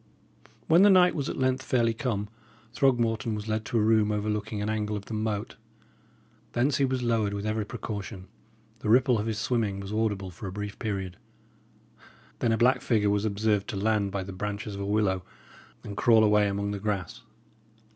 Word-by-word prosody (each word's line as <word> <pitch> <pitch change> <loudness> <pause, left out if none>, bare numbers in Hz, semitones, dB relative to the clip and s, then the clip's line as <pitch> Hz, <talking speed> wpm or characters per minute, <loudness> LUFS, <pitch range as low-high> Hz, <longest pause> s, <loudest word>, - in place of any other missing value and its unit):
When 165 +3 +5
the 205 - +7
night 180 -2 +6
was 140 -3 -2
at - - -4
length 130 0 +1
fairly 120 -3 +1
come, 110 -4 -2 0.5
Throgmorton 115 -5 +1
was 105 +1 -6
led 110 0 -2
to 115 - -1
a 110 - +3
room 110 -1 +3
overlooking 105 0 -2
an 105 - -2
angle 105 -1 -1
of 100 - -8
the - - -7
moat. 110 0 -3 1.0
Thence 130 +3 +2
he 140 - +3
was 130 -1 -1
lowered 110 -4 +1
with 100 +1 -4
every 110 0 -1
precaution; 100 -2 -6 0.5
the 105 - -3
ripple 125 0 +4
of 105 - -2
his 110 -2 -2
swimming 110 -4 -1
was 100 +1 -6
audible 105 -4 -1
for 95 +4 -8
a - - -5
brief 105 +1 -6
period; 95 -5 -3 1.2
then 115 - +1
a 110 - +2
black 125 +3 +3
figure 105 -4 +2
was 105 +1 0
observed 105 -1 0
to 100 - -4
land 105 -1 +1
by 100 -1 -2
the 95 +1 -8
branches 105 +2 -4
of 100 - -5
a - - -2
willow 100 -3 +1 0.6
and 100 - -7
crawl 110 0 +5
away 105 -1 +4
among 100 +1 -2
the 100 - -4
grass. 105 +3 -3
105 Hz, 195 wpm, -27 LUFS, 100-115 Hz, 1.2 s, the